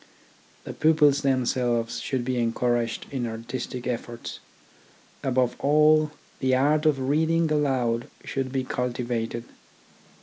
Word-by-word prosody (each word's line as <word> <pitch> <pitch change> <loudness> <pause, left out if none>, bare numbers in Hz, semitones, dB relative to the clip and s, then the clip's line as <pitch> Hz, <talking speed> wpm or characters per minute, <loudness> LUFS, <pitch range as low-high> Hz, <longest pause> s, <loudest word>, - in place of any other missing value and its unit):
The - - -7
pupils 150 -2 +4
them 130 -3 +1
selves 120 -2 0
should 130 -3 -2
be 130 0 -1
encouraged 120 0 0
in 130 -4 -2
artistic 120 +2 -5
efforts. 120 -1 -5 0.8
Above 130 -2 +1
all 155 +1 +4 0.3
the 130 -1 +2
art 150 +4 +3
of 135 -4 +1
reading 160 +2 +2
aloud 130 -6 +1 0.2
should 135 -1 -3
be 135 -1 -1
cultivated. 120 -2 -2
130 Hz, 115 wpm, -26 LUFS, 120-145 Hz, 0.8 s, pupils